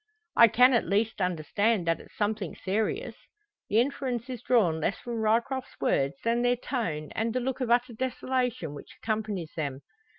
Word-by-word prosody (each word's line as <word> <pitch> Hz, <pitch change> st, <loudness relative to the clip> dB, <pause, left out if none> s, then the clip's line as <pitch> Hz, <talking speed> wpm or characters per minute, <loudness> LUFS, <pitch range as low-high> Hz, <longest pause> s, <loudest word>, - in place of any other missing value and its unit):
"I 235 Hz, -, +9 dB
can 250 Hz, +4 st, +5 dB
at 235 Hz, -, +2 dB
least 210 Hz, +1 st, 0 dB
understand 180 Hz, +4 st, +1 dB
that 165 Hz, 0 st, +1 dB
it's -, -, -16 dB
something 205 Hz, -4 st, -1 dB
serious." 220 Hz, -, -1 dB, 0.6 s
The 215 Hz, -, +4 dB
inference 255 Hz, -1 st, -1 dB
is 245 Hz, -3 st, -6 dB
drawn 200 Hz, -11 st, +3 dB
less 170 Hz, +5 st, 0 dB
from 235 Hz, -2 st, -4 dB
Ryecroft's 235 Hz, +4 st, 0 dB
words 140 Hz, 0 st, +1 dB
than 235 Hz, +1 st, +2 dB
their 245 Hz, 0 st, +3 dB
tone 175 Hz, -, -3 dB
and 225 Hz, +1 st, -2 dB
the -, -, +2 dB
look 260 Hz, +1 st, -3 dB
of 250 Hz, -, -1 dB
utter 240 Hz, +1 st, +2 dB
desolation 250 Hz, -, -2 dB
which 145 Hz, -, -11 dB
accompanies 215 Hz, -7 st, -3 dB
them. 140 Hz, -4 st, -3 dB
225 Hz, 170 wpm, -28 LUFS, 185-245 Hz, 0.6 s, I